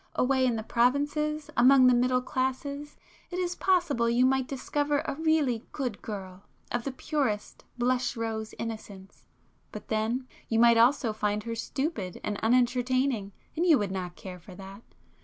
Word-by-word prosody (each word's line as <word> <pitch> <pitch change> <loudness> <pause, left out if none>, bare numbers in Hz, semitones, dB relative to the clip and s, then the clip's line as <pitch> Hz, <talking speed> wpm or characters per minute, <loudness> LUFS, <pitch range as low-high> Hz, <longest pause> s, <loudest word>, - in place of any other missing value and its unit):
Away 260 0 +2
in 240 - +1
the 220 - -3
provinces, 290 +6 0
among 255 +2 +6
the 250 - +6
middle 250 +1 +2
classes 280 +3 -3 0.3
it 355 - -5
is 360 -1 -1
possible 345 -11 +1
you 240 +2 +3
might 265 -1 +2
discover 290 +2 -1
a - - -2
really 295 -6 +1
good 250 -7 -3
girl 190 -3 -7 0.3
of 240 -1 -2
the 275 - -2
purest 260 -6 -3
blush 250 0 0
rose 220 -1 -4
innocence,—but 210 -4 -10
then 230 +4 -1 0.2
you 225 - +1
might 235 0 +6
also 240 -1 +3
find 210 -1 -1
her 230 +1 -4
stupid 230 - -3
and 205 -1 -3
unentertaining, 250 -1 +1 0.2
and 345 +3 +1
you 320 -4 +7
would 205 -4 -2
not 180 -2 -4
care 185 -2 -9
for 180 +2 -13
that. 195 +2 -10
250 Hz, 160 wpm, -28 LUFS, 220-275 Hz, 0.3 s, you